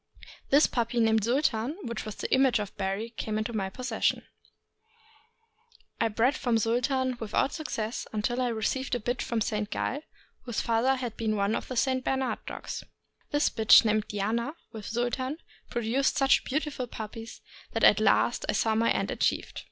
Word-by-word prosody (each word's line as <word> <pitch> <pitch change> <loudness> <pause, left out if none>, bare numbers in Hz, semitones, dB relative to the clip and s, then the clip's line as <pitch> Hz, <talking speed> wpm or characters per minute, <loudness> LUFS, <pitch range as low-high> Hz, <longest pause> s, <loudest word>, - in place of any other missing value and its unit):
This 285 +3 +6
puppy, 235 0 -1
named 220 -2 +3
Sultan, 255 - +1
which 235 -2 -4
was 215 -2 -6
the - - -3
image 265 -1 +4
of 205 -2 -5
Barry, 195 +4 -2
came 215 -2 -3
into 215 +2 -2
my 195 -3 -1
possession. 255 +6 -1 1.8
I 230 - +3
bred 230 +5 +2
from 240 -3 +1
Sultan 250 +3 +1
without 225 +4 0
success 235 -8 -4
until 235 +4 -1
I 250 - +1
received 245 +3 -1
a - - -1
bitch 245 +3 -2
from 230 -2 -1
Saint 210 -1 -1
Galles 280 +6 -2 0.4
whose 240 -4 -2
father 235 +4 +2
had 245 -4 -4
been 220 -1 0
one 200 +1 +1
of - - -3
the 255 - -5
St. 260 +1 +1
Bernard 265 0 -1
dogs. - - -6 0.5
This 290 +1 +2
bitch, 220 +1 +7
named 215 -1 +1
Diana, 225 +8 -2 0.2
with 215 -3 -8
Sultan, 245 +5 -2 0.3
produced 240 +4 0
such 270 -1 +4
beautiful 285 -3 -2
puppies 225 0 -8 0.3
that - - -1
at - - +7
last - - +3
I - - +3
saw 220 - +2
my 225 +1 +2
end - - 0
achieved. - - -1
235 Hz, 170 wpm, -28 LUFS, 220-260 Hz, 1.8 s, bitch